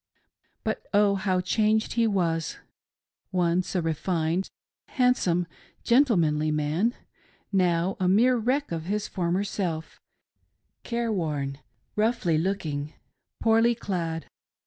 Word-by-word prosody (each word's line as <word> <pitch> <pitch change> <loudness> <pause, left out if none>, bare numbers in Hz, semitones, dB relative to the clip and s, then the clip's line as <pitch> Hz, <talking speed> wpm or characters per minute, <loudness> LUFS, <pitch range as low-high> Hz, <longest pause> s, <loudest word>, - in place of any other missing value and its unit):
But, - - -3
oh, 205 -1 +5
how 190 -2 0
changed 215 +3 +1
he 230 -1 +2
was! 170 -6 0 0.7
Once 180 0 0
a 180 - +1
refined, 165 +2 -1 0.4
handsome, 250 - +2 0.4
gentlemanly 170 - +3
man; 155 +10 0 0.6
now 180 -1 +1
a 185 - +1
mere 235 +7 +4
wreck 255 +5 0
of 165 -1 -3
his 205 +2 -1
former 180 +1 -1
self 175 -5 -4 0.8
^ - - -52
careworn, 165 - -2 0.4
rough 220 0 +1
looking, 160 -3 -1 0.5
poorly 230 +1 +4
clad. 170 -7 -3
185 Hz, 105 wpm, -26 LUFS, 165-215 Hz, 0.8 s, oh